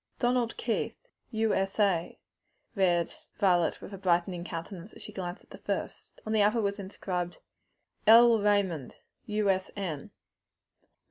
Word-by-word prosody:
"'Donald 245 -2 +1
Keith, 230 -2 -1 0.3
U.S.A.,'" 195 -5 +1 0.6
read 175 -4 +2 0.2
Violet 175 -4 +2
with 200 - -9
a 195 - -7
brightening 175 -1 +1
countenance, 175 +3 -7
as - - -12
she - - -9
glanced 180 -2 -5
at - - -28
the - - -10
first. - - -5
On 220 - -2
the 215 - +4
other 210 +3 +3
was 200 -1 -1
inscribed, 180 -2 -4 0.7
"L. 230 +1 +8
Raymond, 200 -9 +1 0.3
U.S.N." 195 -6 -1
195 Hz, 125 wpm, -29 LUFS, 175-215 Hz, 0.7 s, L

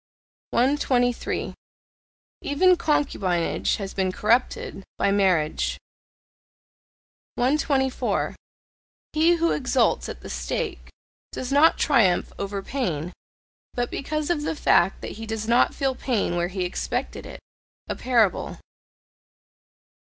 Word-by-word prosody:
123. 245 -2 +1 0.9
Even 365 +6 +4
concubinage 200 - 0
has 195 -3 -6
been 190 -1 0
corrupted 210 -1 0
by 200 - +2
marriage. 185 -6 +1 1.6
124. 265 0 0 0.8
He 320 +2 +4
who 335 0 +1
exults 260 - +1
at - - -8
the - - -9
stake, 430 -8 -4 0.4
does 255 +1 -5
not 295 +4 +5
triumph 220 - +2
over 200 0 -3
pain, 180 - -3 0.6
but 245 0 -1
because 305 +3 -2
of 320 -4 0
the 305 - -2
fact 185 - +3
that - - -5
he 225 - -6
does 220 0 -4
not 235 +1 +3
feel 270 -2 0
pain 240 -8 -1
where 175 0 0
he 185 0 -3
expected 180 - -3
it. - - -9 0.5
A - - -3
parable. 235 -6 +1
245 Hz, 110 wpm, -24 LUFS, 195-290 Hz, 1.6 s, not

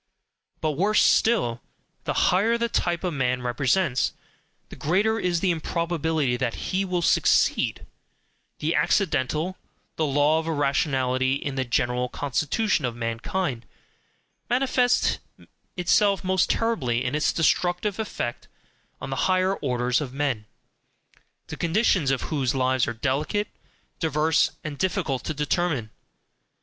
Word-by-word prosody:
But 155 - +1
worse 195 +9 +2
still. 125 - +2 0.4
The - - +2
higher 215 +6 +2
the 235 0 0
type 175 -5 -1
a 180 - 0
man 125 -3 -1
represents, 130 +4 +1 0.6
the - - -10
greater 205 +8 +1
is 175 -4 0
the 190 - +2
improbability 160 -5 -1
that 120 -2 -2 0.2
he 190 +1 +1
will 180 -2 -1
SUCCEED; - - +2 0.7
the 160 +3 -1
accidental, 170 -1 0 0.4
the 160 - +1
law 145 +3 +3
of 160 - -5
irrationality 135 -3 +1
in 140 0 -4
the 130 -1 -1
general 125 +1 0
constitution 150 - 0
of 120 -2 -2
mankind, 120 +4 -3 0.8
manifests 250 0 +2 0.6
itself 195 +2 +2
most 185 0 +1
terribly 130 - 0
in 125 - -1
its 150 +1 +2
destructive 180 +5 +1
effect 120 - -4 0.5
on - - -6
the 135 - 0
higher 185 +1 +2
orders 125 -1 0
of 135 -3 -6
men, 135 -7 -1 1.0
the - - -7
conditions 175 - +2
of 135 -2 0
whose 135 -4 0
lives 130 -1 +1
are 120 - -2
delicate, 150 - -1 0.5
diverse, 155 0 +2
and 150 -2 -6
difficult 180 -9 -1
to 155 - -3
determine. 150 -6 -1
155 Hz, 130 wpm, -25 LUFS, 130-185 Hz, 1.0 s, law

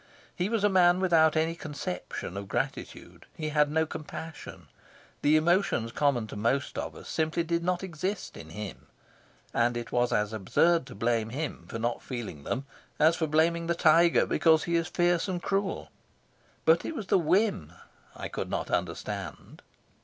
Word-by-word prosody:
He 180 +3 -1
was 225 -3 0
a - - +6
man 180 -2 +4
without 165 -4 +4
any 160 +1 +1
conception 145 - -5
of 100 0 -5
gratitude. - - -4
He 155 -1 -3
had 150 -1 +3
no 160 +1 +2
compassion. 155 - -8 0.5
The 150 +2 +5
emotions 160 - +2
common 140 -5 +1
to - - -9
most 115 +7 0
of - - -4
us - - -11
simply 160 +1 0
did 170 0 -1
not 180 +1 0
exist 185 +3 -4
in 80 - -10
him, 100 +2 -8 0.7
and 120 0 +2
it 120 -1 -6
was 120 0 +1
as 105 +1 0
absurd 165 - +2
to 125 - -10
blame 115 -1 0
him 145 +6 -5
for - - -5
not 120 +1 -2
feeling 110 - -6
them 135 +3 -2 0.3
as 160 +2 +5
for 160 -2 -1
blaming 165 +2 +2
the 170 - +1
tiger 165 +1 +5
because 160 -1 +3
he 170 - -1
is 165 0 +1
fierce 175 0 +1
and 180 -2 -3
cruel. 195 0 -1 0.7
But 165 +1 +5
it 325 - -4
was 225 -7 -4
the 185 - +3
whim 190 +6 +1 0.4
I - - -5
could - - -5
not - - -3
understand. - - -4
160 Hz, 175 wpm, -28 LUFS, 120-175 Hz, 0.7 s, a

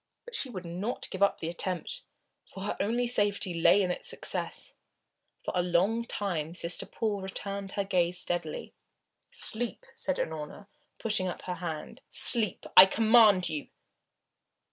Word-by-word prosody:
But 485 - -12
she 280 - -1
would 185 -6 -7
not 185 +8 -4
give 190 - -6
up 200 - +3
the 160 - -5
attempt, 185 - -3 0.5
for 190 - -11
her 205 - -2
only 240 +4 0
safety 205 -6 +1
lay 170 +4 +4
in 180 - 0
its - - -4
success. - - -3 0.7
For - - -3
a 180 - +3
long 185 +7 +1
time 175 -8 -3
Sister 170 0 +2
Paul 210 -3 -2
returned 195 0 -5
her 200 - -1
gaze 180 -2 +1
steadily. 175 -3 -2 0.6
"Sleep!" 240 - -1
said 280 -1 -3
Unorna, 160 +5 -5 0.3
putting 210 -4 0
up 180 - -6
her 180 - -4
hand. 160 -3 -6
"Sleep, 215 +4 +3
I 185 - +11
command 215 -3 +5
you!" 150 -2 -4
195 Hz, 150 wpm, -29 LUFS, 175-220 Hz, 0.7 s, I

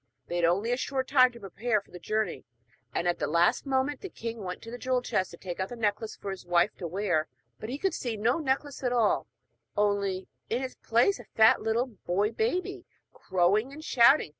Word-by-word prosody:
They 175 - -1
had 175 - +3
only 195 +8 +2
a 245 - +1
short 265 -1 -2
time 255 -2 +6
to 235 - -13
prepare 215 +3 -1
for 200 - -21
the 180 - -9
journey, 215 +3 -2 0.5
and 175 - -1
at 175 - +1
the - - 0
last 170 - +2
moment 270 +1 0
the 390 - -6
king 230 -5 -6
went 180 -3 -6
to 230 - -8
the 245 - -7
jewel 255 0 0
chest 190 -5 0
to 170 - -11
take 175 -1 -6
out 190 - -2
the 245 - -6
necklace 215 -1 -1
for 200 - -6
his 195 - -7
wife 175 +3 +2
to 175 - -4
wear, 175 -3 0 0.3
but 215 - -6
he 265 - -3
could 380 +3 0
see 235 -7 -3
no 235 +8 +2
necklace 280 -1 -1
at 250 -2 0
all, 230 -4 +2 0.5
only, 200 -2 +1 0.2
in 245 +3 0
its 260 - -4
place, 240 - +2
a - - -9
fat 220 0 +5
little 225 +3 +1
boy 205 -3 -1
baby 380 - -1 0.3
crowing 195 +7 +1
and 310 +2 -10
shouting. 250 - +5
225 Hz, 220 wpm, -29 LUFS, 190-260 Hz, 0.5 s, time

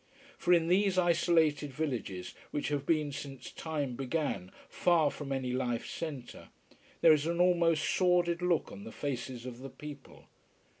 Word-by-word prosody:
For 175 - 0
in 170 -2 +5
these 190 +1 +3
isolated 165 -4 +3
villages, 125 -11 -3 0.2
which 145 - -2
have 145 -1 -2
been 155 -3 +2
since 140 -2 -7
time 145 -6 -3
began 135 - -2 0.2
far 165 -5 +3
from 140 -2 -7
any 130 -2 -1
life 120 -2 -1
centre, 145 -7 -6 0.5
there 160 - +8
is 150 +1 +1
an 170 +1 -1
almost 170 -3 +3
sordid 175 -2 +2
look 175 -3 +1
on 100 - -9
the 110 - -8
faces 125 -3 -4
of 125 -1 -7
the 135 +1 -7
people. 145 0 -11
150 Hz, 155 wpm, -31 LUFS, 130-170 Hz, 0.5 s, there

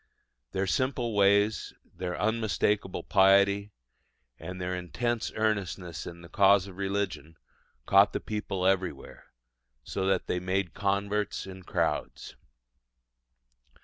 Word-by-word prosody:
Their 95 +1 -1
simple 125 +1 -1
ways, 100 +1 +3 0.2
their 90 -1 -4
unmistakable 105 -3 0
piety, 100 +1 +4 0.7
and 90 0 -7
their 90 0 -2
intense 110 +7 -2
earnestness 95 -6 -2
in 85 0 -9
the 85 - -11
cause 100 0 +4
of 95 -2 -11
religion 95 -6 -3 0.5
caught 100 +5 +5
the - - -2
people 105 -3 -3
everywhere, 95 -1 -1 0.6
so 95 +8 -2
that 95 -2 +1
they 90 - -1
made 95 -1 -1
converts 100 +1 -1
in 95 0 -9
crowds. - - -2
95 Hz, 115 wpm, -29 LUFS, 90-105 Hz, 0.7 s, caught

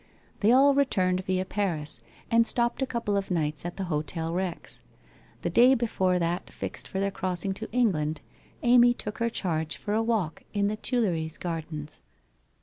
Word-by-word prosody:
They 215 +2 +4
all 275 +3 +6
returned 185 -10 +2
via 185 0 0
Paris, 160 - -2 0.3
and 230 0 +5
stopped 240 +2 0
a 265 - +1
couple 235 -5 -1
of 200 -1 -1
nights 155 -2 0
at 175 - -7
the 195 - -2
Hotel 165 0 -2
Rex. 180 -1 -4 0.6
The - - -1
day 255 +3 +6
before 190 -6 +1
that 175 +1 -1
fixed - - -5
for 190 - -4
their 200 0 0
crossing 185 0 -2
to 220 +3 -6
England, 160 -11 +1 0.4
Amy 240 0 +6
took 210 - -6
her 230 0 +1
charge 160 -8 -2
for 205 - -3
a 220 - +2
walk 220 -8 -1
in 200 -1 +1
the 215 - -2
Tuileries 180 - -1
Gardens. 155 -3 -5
190 Hz, 170 wpm, -27 LUFS, 165-230 Hz, 0.6 s, all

